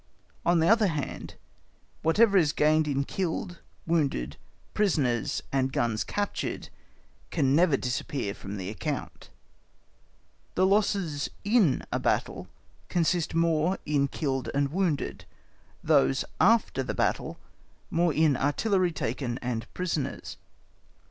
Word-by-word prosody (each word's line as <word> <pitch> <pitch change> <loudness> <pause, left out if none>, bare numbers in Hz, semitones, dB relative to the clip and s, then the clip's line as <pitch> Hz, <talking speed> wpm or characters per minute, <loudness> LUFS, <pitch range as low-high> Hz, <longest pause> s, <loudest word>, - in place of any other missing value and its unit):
On 175 0 +5
the 160 - +3
other 225 0 +5
hand, 150 -5 -4 0.7
whatever 200 +6 +4
is 160 -6 +4
gained 155 +1 +3
in 140 -1 0
killed, 175 +2 -3 0.3
wounded, 140 - 0 0.4
prisoners, 140 - +1
and 135 -1 +1
guns 115 -4 0
captured 205 0 -3 0.6
can 140 -4 +2
never 165 -3 +4
disappear 125 -3 -3
from 100 +1 -7
the 95 +1 -4
account. 140 +5 -5 1.3
The 185 - +4
losses 195 -7 +1
in 205 - +3
a - - 0
battle - - -1 0.4
consist 170 -2 0
more 165 +2 +2
in 145 -2 +2
killed 135 -3 -2
and 140 0 +2
wounded; 175 -4 -1 0.6
those 135 - +3
after 220 -9 +3
the 130 - -3
battle, - - -1 0.5
more 170 0 +2
in 155 -2 +3
artillery 180 - +1
taken 125 -3 -3
and 120 -3 -4
prisoners. 170 -6 -3
155 Hz, 115 wpm, -28 LUFS, 135-180 Hz, 1.3 s, On